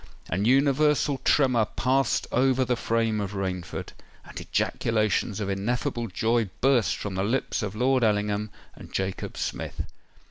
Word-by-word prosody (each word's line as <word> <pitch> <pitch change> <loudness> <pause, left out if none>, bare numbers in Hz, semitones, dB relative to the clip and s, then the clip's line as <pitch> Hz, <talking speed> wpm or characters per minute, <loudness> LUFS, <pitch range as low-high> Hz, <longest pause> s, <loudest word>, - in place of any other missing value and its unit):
An 95 +3 0
universal 140 +2 +3
tremor 125 -7 +3
passed 130 +3 +1
over 130 +1 +3
the 125 - +1
frame 115 -2 0
of 100 0 -4
Rainford; 90 -3 -4 0.4
and - - -8
ejaculations 110 -1 0
of 105 - -2
ineffable 120 +5 -1
joy 115 +2 0
burst 130 -4 +3
from 100 - -5
the 95 +1 -1
lips 125 +6 -1
of 105 -1 -4
Lord 125 +2 +2
Ellingham 105 0 +1 0.2
and - - -13
Jacob 95 -1 -3
Smith. - - -4
115 Hz, 140 wpm, -26 LUFS, 105-130 Hz, 0.4 s, universal